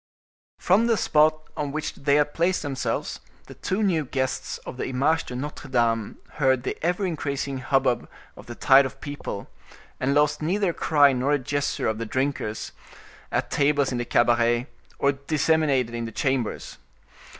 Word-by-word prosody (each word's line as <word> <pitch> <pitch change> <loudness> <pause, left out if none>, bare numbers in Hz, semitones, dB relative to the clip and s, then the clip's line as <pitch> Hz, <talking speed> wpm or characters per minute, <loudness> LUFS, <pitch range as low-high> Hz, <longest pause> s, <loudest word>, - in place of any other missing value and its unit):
From 205 +6 +3
the 230 -2 +3
spot 155 -2 +3
on 145 -2 -3
which 155 +1 -3
they 140 0 +1
had 150 0 +2
placed 175 +1 +1
themselves 140 -3 -3 0.3
the - - -11
two 195 +3 -2
new 170 -6 +2
guests 130 -1 -2
of - - -7
the - - -3
Image 140 +6 +1
de 125 - -7
Notre 145 +3 -6
Dame 115 -4 0 0.2
heard 130 -4 +2
the - - -2
ever 180 +4 +1
increasing 140 -5 -3
hubbub 135 -2 +1 0.3
of - - -13
the 120 - -7
tide 135 +2 +5
of 135 +1 -13
people, 145 -8 -6 0.5
and 135 +2 +1
lost 150 +1 +2
neither 185 +4 +1
a - - -11
cry 145 -5 +4
nor 130 +3 +1
a - - +4
gesture 145 +2 -2
of 110 0 -1
the 115 - -4
drinkers, 130 -4 -2 0.6
at - - -1
tables 140 -1 +2
in 125 - -2
the 120 - -2
cabaret, 120 0 +2 0.3
or 140 - +3
disseminated 140 -3 +1
in 115 0 -3
the 115 - -6
chambers. 130 -1 -2
140 Hz, 170 wpm, -25 LUFS, 125-155 Hz, 0.6 s, tide